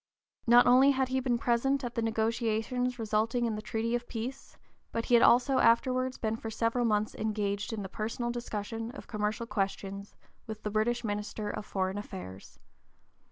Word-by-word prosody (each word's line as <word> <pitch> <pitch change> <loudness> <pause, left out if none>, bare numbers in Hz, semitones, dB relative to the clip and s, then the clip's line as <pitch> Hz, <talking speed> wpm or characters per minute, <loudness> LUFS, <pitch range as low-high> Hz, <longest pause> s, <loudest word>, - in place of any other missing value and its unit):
Not 240 +1 +7
only 255 +3 +6
had 265 -1 +1
he 260 0 +1
been 250 -2 +1
present 265 +4 +1
at 240 -1 -4
the 230 - -1
negotiations 225 +2 0
resulting 225 +2 0
in 230 - 0
the 215 - -4
treaty 225 +2 -2
of 240 0 -1
peace, 250 +4 -6 0.3
but 230 - -2
he - - -1
had 235 - +7
also 255 +2 +5
afterwards 255 +2 +3
been 220 -1 -1
for 225 - -6
several 230 +2 0
months 215 -1 +1
engaged 210 -1 -2
in 215 -2 -4
the - - -4
personal 230 +4 -3
discussion 225 -1 -4
of - - -9
commercial 215 +2 -2
questions 200 -1 -3 0.3
with 220 -1 -5
(p. - - -33
050) - - -37
the 210 - -2
British 235 +3 +1
minister 210 0 -3
of 210 - -6
foreign 190 +1 -1
affairs. 95 - -9
225 Hz, 185 wpm, -30 LUFS, 210-240 Hz, 0.3 s, Not